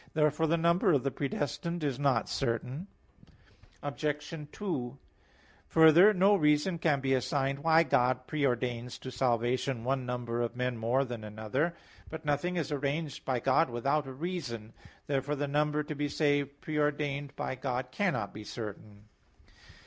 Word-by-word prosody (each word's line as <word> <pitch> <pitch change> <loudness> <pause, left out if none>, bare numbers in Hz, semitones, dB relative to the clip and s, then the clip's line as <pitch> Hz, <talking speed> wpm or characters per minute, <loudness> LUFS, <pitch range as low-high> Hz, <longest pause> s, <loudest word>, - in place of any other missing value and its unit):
Therefore 150 +1 +2
the 165 +2 +2
number 170 +1 +3
of 140 - +2
the 135 - 0
predestined 150 +5 -3
is 140 -3 -1
not 135 -5 +2
certain. 125 - -2 1.0
Obj. 150 +1 -3 0.2
2: 140 - -4 0.7
Further, 160 +5 +7
no 200 +1 +4
reason 150 +1 +2
can 150 -4 +2
be 135 0 +1
assigned 135 +1 0
why 160 +2 +5
God 125 -3 +2
pre 150 0 -2
ordains 125 -1 -1
to 130 - -8
salvation 125 0 0
one 130 +1 0
number 120 -1 -2
of 120 0 -2
men 125 0 -1
more 120 +4 +1
than 120 -3 -6
another. 110 +10 -2 0.3
But 160 0 -7
nothing 150 +5 0
is 160 -4 -2
arranged 145 +1 -2
by 130 -3 0
God 135 +5 +3
without 135 +5 0
a - - -6
reason. 130 -8 -5 0.3
Therefore 140 +1 -1
the 145 0 -2
number 150 +1 +1
to 150 - -5
be 145 0 -2
saved 145 -1 0
pre 155 -1 -2
ordained 145 -1 -1
by - - -3
God 125 -1 -3
cannot 130 - -1
be 105 - -8
certain. 105 -1 -8
140 Hz, 155 wpm, -31 LUFS, 125-150 Hz, 1.0 s, Further